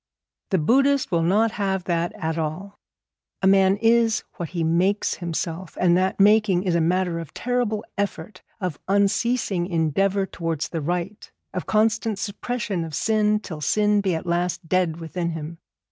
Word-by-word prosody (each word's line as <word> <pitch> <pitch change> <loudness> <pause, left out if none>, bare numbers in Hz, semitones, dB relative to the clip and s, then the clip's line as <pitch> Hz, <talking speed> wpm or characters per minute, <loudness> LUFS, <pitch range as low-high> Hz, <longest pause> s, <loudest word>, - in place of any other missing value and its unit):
The 190 - +2
Buddhist 270 - +2
will 170 -2 +2
not 210 +7 +2
have 195 -4 -1
that 170 0 -1
at 160 -7 -3
all. 165 +6 -4 0.6
A - - +3
man 195 0 +5
is 230 0 +3
what 170 -3 -4
he 170 -2 -2
makes 180 +5 +1
himself; 170 0 -4
and 175 -1 +4
that 185 +2 0
making 205 -2 +4
is 185 -3 0
a 170 - +2
matter 175 0 +1
of 165 -4 -9
terrible 240 -4 -1
effort, 200 -1 -4 0.2
of 180 -7 -3
unceasing 200 -1 +1
endeavour 190 +4 +1
towards 165 -5 -3
the 165 - -3
right, 175 +6 -4 0.2
of 180 - -4
constant 220 0 +1
suppression 205 -2 -3
of 160 -2 -6
sin, 215 -1 +2
till 160 -7 -7
sin 210 +6 +2
be 190 -4 0
at 160 - -5
last 175 0 -1
dead 175 -2 +1
within 170 +1 -3
him. 160 +1 -7
185 Hz, 160 wpm, -23 LUFS, 170-210 Hz, 0.6 s, man